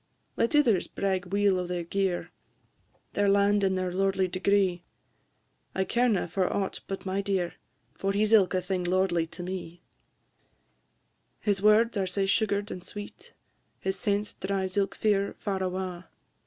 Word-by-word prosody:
Let 230 Hz, -, +1 dB
ithers 235 Hz, -11 st, +4 dB
brag 190 Hz, -2 st, -1 dB
weel 200 Hz, 0 st, +2 dB
o' 180 Hz, -, -3 dB
their 175 Hz, -1 st, -2 dB
gear, 190 Hz, 0 st, -1 dB, 0.8 s
Their 205 Hz, 0 st, +2 dB
land 200 Hz, +1 st, +3 dB
and 190 Hz, -1 st, +2 dB
their 185 Hz, -1 st, -2 dB
lordly 195 Hz, 0 st, +1 dB
degree; 185 Hz, -1 st, +1 dB, 0.9 s
I 190 Hz, -, +2 dB
carena 235 Hz, -6 st, +1 dB
for 185 Hz, +2 st, 0 dB
aught 195 Hz, -1 st, -2 dB
but 195 Hz, 0 st, -5 dB
my 190 Hz, +1 st, -1 dB
dear, 190 Hz, -3 st, -1 dB, 0.4 s
For 195 Hz, -, -1 dB
he 205 Hz, +2 st, +2 dB
's 215 Hz, -, 0 dB
ilka 190 Hz, -3 st, +5 dB
thing 180 Hz, 0 st, -2 dB
lordly 175 Hz, -2 st, +1 dB
to 170 Hz, +2 st, -8 dB
me: 175 Hz, -1 st, -6 dB, 1.6 s
His 200 Hz, -2 st, 0 dB
words 215 Hz, +2 st, +4 dB
are 190 Hz, -1 st, 0 dB
sae 195 Hz, +2 st, 0 dB
sugar'd 205 Hz, 0 st, +1 dB
and 180 Hz, -, -6 dB
sweet! 205 Hz, +1 st, -9 dB, 0.5 s
His 190 Hz, 0 st, -1 dB
sense 205 Hz, -2 st, -1 dB
drives 190 Hz, -1 st, -2 dB
ilk 200 Hz, -1 st, 0 dB
fear 200 Hz, -2 st, +1 dB
far 195 Hz, -2 st, -2 dB
awa'! 185 Hz, -1 st, -3 dB
195 Hz, 155 wpm, -28 LUFS, 185-200 Hz, 1.6 s, ilka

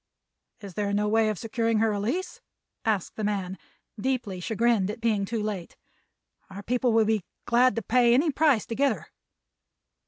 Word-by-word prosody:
"Is 200 Hz, -3 st, -9 dB
there 200 Hz, +2 st, -2 dB
no 210 Hz, +1 st, +1 dB
way 220 Hz, +1 st, +3 dB
of 215 Hz, -, -2 dB
securing 225 Hz, +2 st, -1 dB
her 220 Hz, 0 st, +2 dB
release?" 235 Hz, -, -3 dB, 0.4 s
asked 210 Hz, -5 st, -1 dB
the 215 Hz, -, -3 dB
man, 195 Hz, -3 st, -2 dB, 0.4 s
deeply 235 Hz, -6 st, -2 dB
chagrined 220 Hz, 0 st, +1 dB
at 210 Hz, -, -5 dB
being 220 Hz, -4 st, +1 dB
too 225 Hz, +1 st, -3 dB
late. 200 Hz, -5 st, -5 dB, 0.7 s
"Our 195 Hz, +1 st, -9 dB
people 245 Hz, +2 st, +1 dB
will 225 Hz, -1 st, +4 dB
be 215 Hz, -3 st, +1 dB, 0.2 s
glad 250 Hz, +2 st, +4 dB
to 230 Hz, -, -2 dB
pay 240 Hz, 0 st, +4 dB
any 300 Hz, +4 st, +3 dB
price 290 Hz, -5 st, +2 dB
to 230 Hz, -, -5 dB
get 275 Hz, -1 st, +3 dB
her." 155 Hz, -4 st, -14 dB
220 Hz, 175 wpm, -26 LUFS, 205-240 Hz, 0.7 s, will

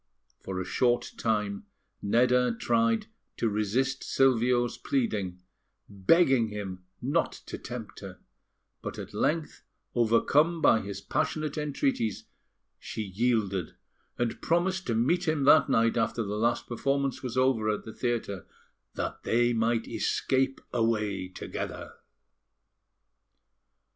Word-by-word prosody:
For 95 Hz, -1 st, -5 dB
a 95 Hz, -, -3 dB
short 120 Hz, +6 st, +1 dB
time, 105 Hz, -3 st, -1 dB, 0.3 s
Nedda 125 Hz, +2 st, +3 dB
tried 115 Hz, -1 st, +2 dB, 0.3 s
to 115 Hz, -, +1 dB
resist 115 Hz, +6 st, 0 dB
Silvio's 120 Hz, -2 st, +2 dB
pleading, 100 Hz, -9 st, -1 dB, 0.4 s
begging 120 Hz, -, +3 dB
him 95 Hz, -3 st, -6 dB, 0.2 s
not 145 Hz, +6 st, +1 dB
to -, -, -6 dB
tempt 120 Hz, -4 st, -7 dB
her; 95 Hz, -2 st, -9 dB, 0.6 s
but -, -, -6 dB
at -, -, -8 dB
length, 160 Hz, 0 st, -1 dB, 0.3 s
overcome 140 Hz, +8 st, +3 dB
by 115 Hz, -, +5 dB
his 100 Hz, 0 st, -6 dB
passionate 155 Hz, +6 st, -1 dB
entreaties, 140 Hz, -7 st, -1 dB, 0.6 s
she 110 Hz, -, -5 dB
yielded, 100 Hz, -2 st, 0 dB, 0.4 s
and 120 Hz, -1 st, -2 dB
promised 185 Hz, +3 st, 0 dB
to 115 Hz, -, 0 dB
meet 170 Hz, +10 st, +1 dB
him 155 Hz, -3 st, +1 dB
that 150 Hz, +3 st, +6 dB
night 115 Hz, 0 st, +3 dB
after 115 Hz, 0 st, 0 dB
the 100 Hz, 0 st, -4 dB
last 115 Hz, +2 st, +1 dB
performance 135 Hz, +2 st, -1 dB
was 130 Hz, -1 st, -4 dB
over 130 Hz, -4 st, +2 dB
at 105 Hz, -, -1 dB
the 110 Hz, -, -8 dB
theatre, 115 Hz, -7 st, -3 dB, 0.5 s
that -, -, -4 dB
they 120 Hz, +1 st, +2 dB
might 115 Hz, 0 st, +1 dB
escape 135 Hz, 0 st, 0 dB
away 105 Hz, -5 st, 0 dB
together. 90 Hz, -, -6 dB
115 Hz, 120 wpm, -28 LUFS, 105-135 Hz, 0.6 s, that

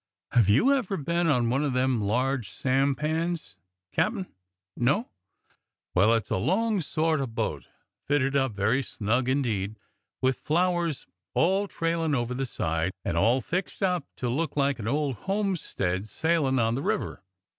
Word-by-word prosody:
Have 115 Hz, -5 st, +4 dB
you 235 Hz, -, +5 dB
ever 220 Hz, -8 st, 0 dB
been 170 Hz, +3 st, 0 dB
on 120 Hz, -6 st, +2 dB
one 135 Hz, +3 st, +1 dB
o' 150 Hz, -, +1 dB
them 125 Hz, -2 st, +1 dB
large 125 Hz, +2 st, 0 dB
sampans. 150 Hz, -, 0 dB, 0.4 s
Captain.'^ 205 Hz, -4 st, -1 dB, 0.4 s
No.'^ 140 Hz, -, +1 dB, 0.8 s
Well, 105 Hz, +5 st, +5 dB
it's 115 Hz, -, -2 dB
a -, -, +2 dB
long 195 Hz, -, +1 dB
sort 155 Hz, 0 st, 0 dB
o' 135 Hz, -, -1 dB
boat, 115 Hz, -, -3 dB, 0.4 s
fitted 140 Hz, -1 st, +1 dB
up 135 Hz, -3 st, +2 dB
very 105 Hz, +7 st, +1 dB
snug 120 Hz, +1 st, -1 dB
indeed, 110 Hz, -7 st, 0 dB, 0.4 s
with 130 Hz, 0 st, +1 dB
flowers 175 Hz, -1 st, 0 dB, 0.3 s
all 190 Hz, +5 st, +3 dB
trailin' 165 Hz, -4 st, 0 dB
over 120 Hz, -1 st, -1 dB
the 135 Hz, +1 st, -2 dB
side, 80 Hz, -3 st, -1 dB
and -, -, -1 dB
all 115 Hz, +9 st, +3 dB
fixed 185 Hz, -, -3 dB
up 180 Hz, -2 st, +1 dB
to 125 Hz, -, -3 dB
look 150 Hz, +6 st, -1 dB
like 140 Hz, -2 st, +2 dB
an 105 Hz, -, -4 dB
old 140 Hz, -1 st, 0 dB
homestead 180 Hz, -, -1 dB
sailin' 155 Hz, 0 st, +1 dB
on 115 Hz, -2 st, +2 dB
the 130 Hz, -, -2 dB
river. 210 Hz, -, -2 dB
135 Hz, 155 wpm, -27 LUFS, 120-170 Hz, 0.8 s, you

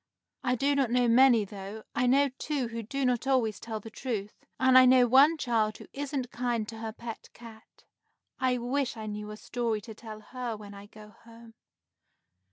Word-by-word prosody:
"I 250 Hz, -1 st, +1 dB
do 275 Hz, +4 st, +1 dB
not 275 Hz, -4 st, +1 dB
know 245 Hz, 0 st, +2 dB
many, 235 Hz, -2 st, +5 dB
though. 200 Hz, +2 st, -8 dB
I 250 Hz, +1 st, +1 dB
know 280 Hz, +3 st, +4 dB
two 280 Hz, -6 st, -2 dB
who 230 Hz, 0 st, -5 dB
do 270 Hz, +5 st, -3 dB
not 250 Hz, +1 st, 0 dB
always 230 Hz, -7 st, +1 dB
tell 225 Hz, -1 st, -5 dB
the 225 Hz, +2 st, -11 dB
truth; 215 Hz, -4 st, -4 dB, 0.3 s
and 260 Hz, 0 st, +4 dB
I 255 Hz, -, +10 dB
know 255 Hz, -1 st, +6 dB
one 275 Hz, +7 st, +6 dB
child 225 Hz, -6 st, 0 dB
who -, -, -12 dB
isn't 275 Hz, -3 st, -4 dB
kind 235 Hz, -3 st, -2 dB
to 225 Hz, -1 st, -8 dB
her 225 Hz, 0 st, -4 dB
pet 230 Hz, 0 st, -9 dB
cat. 225 Hz, -2 st, -15 dB, 0.6 s
I 255 Hz, -1 st, +1 dB
wish 245 Hz, +1 st, -2 dB
I 220 Hz, -, -6 dB
knew 210 Hz, 0 st, -5 dB
a 210 Hz, -, -8 dB
story 230 Hz, -1 st, -2 dB
to 220 Hz, +1 st, -10 dB
tell 215 Hz, -1 st, -10 dB
her 245 Hz, -1 st, -5 dB
when 205 Hz, -1 st, -11 dB
I 200 Hz, 0 st, -11 dB
go 210 Hz, 0 st, -14 dB
home." 230 Hz, 0 st, -15 dB
235 Hz, 195 wpm, -29 LUFS, 220-255 Hz, 0.6 s, I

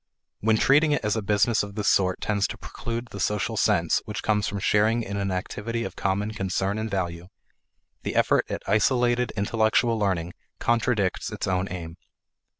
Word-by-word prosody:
When 110 Hz, +1 st, +3 dB
treating 150 Hz, +5 st, +4 dB
it 145 Hz, -, -1 dB
as 105 Hz, -, +1 dB
a 110 Hz, -, -1 dB
business 105 Hz, +2 st, +2 dB
of 100 Hz, -1 st, -6 dB
this 105 Hz, -2 st, -2 dB
sort 95 Hz, -1 st, +2 dB
tends 100 Hz, -2 st, +1 dB
to -, -, -7 dB
preclude 115 Hz, 0 st, -6 dB
the 100 Hz, -, -7 dB
social 105 Hz, +3 st, 0 dB
sense 95 Hz, -6 st, +2 dB
which 105 Hz, -1 st, -5 dB
comes 105 Hz, -1 st, +1 dB
from 100 Hz, -, -3 dB
sharing 110 Hz, +4 st, +2 dB
in 100 Hz, -1 st, -5 dB
an 100 Hz, -1 st, -1 dB
activity 105 Hz, +5 st, -3 dB
of -, -, -6 dB
common 100 Hz, +2 st, -1 dB
concern 95 Hz, +1 st, -1 dB
and 110 Hz, +1 st, -3 dB
value, 90 Hz, -3 st, -3 dB, 0.7 s
the -, -, -4 dB
effort -, -, +2 dB
at -, -, -4 dB
isolated 120 Hz, +3 st, +2 dB
intellectual 110 Hz, +2 st, +2 dB
learning 90 Hz, -4 st, -1 dB, 0.3 s
contradicts 115 Hz, -4 st, 0 dB
its -, -, -3 dB
own 95 Hz, 0 st, 0 dB
aim. 85 Hz, -2 st, -7 dB
105 Hz, 175 wpm, -25 LUFS, 95-115 Hz, 0.7 s, treating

